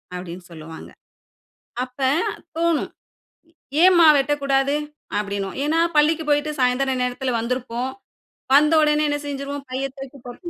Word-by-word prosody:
அப்படின்னு 180 0 -7
சொல்லுவாங்க. 160 0 -10 1.0
அப்ப 250 +1 -18 0.6
தோணும் 335 -2 0 0.9
"ஏம்மா 355 -3 +7
வெட்டக்கூடாது". 275 0 +1 0.4
அப்படினுவோ 200 -2 -3
ஏன்னா 305 +3 +1 0.2
பள்ளிக்கு 305 +2 +3
போயிட்டு 295 +1 +2
சாயந்தர 255 +2 +2
நேரத்தில 250 +1 -2
வந்திருப்போம் 250 +1 -3 0.6
வந்த 300 +3 +5
உடனே 300 0 +3
என்ன 290 - 0
செஞ்சுருவோ 280 0 -4
பைய 260 +1 -2
தூக்கி 270 +1 -9
போட்டு 245 +8 -8
270 Hz, 115 wpm, -22 LUFS, 245-295 Hz, 1.0 s, ஏம்மா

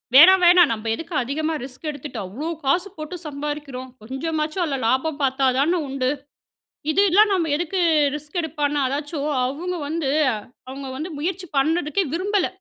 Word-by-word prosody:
வேணாம், 370 +6 +9
வேணாம் 350 -5 +7
நம்ம 225 0 -4
எதுக்கு 330 +5 -8
அதிகமாக 310 +3 -2
ரிஸ்க் 275 +4 -7
எடுத்துட்டு, 285 -4 -7
அவ்ளோ 240 - -6 0.2
காசு 355 +8 +2
போட்டு 310 +3 -6
சம்பாதிக்கிறோம். 285 -3 -5
கொஞ்சமாச்சும் 310 - -2
அதில 285 -5 -1
லாபம் 285 +4 0
பார்த்தா 265 0 +1
தான 340 +5 +2
உண்டு. 260 -1 -1 0.8
இது 385 - +3
எல்லாம் 415 +3 +5
நம்ம 340 -4 +1
எதுக்கு 345 +4 -2 0.4
ரிஸ்க் 300 +4 -6
எடுப்பான்னா! 295 -2 -1
அதாச்சும் 290 +2 -3 0.2
அவுங்க 330 +8 -3
வந்து 310 -3 -1 0.6
அவுங்க 270 +1 -7
வந்து 320 +5 -5
முயற்சி 365 +4 -3
பண்றதுக்கே 325 +5 +1
விரும்பல. 395 +1 +1
300 Hz, 150 wpm, -23 LUFS, 275-345 Hz, 0.8 s, வேணாம்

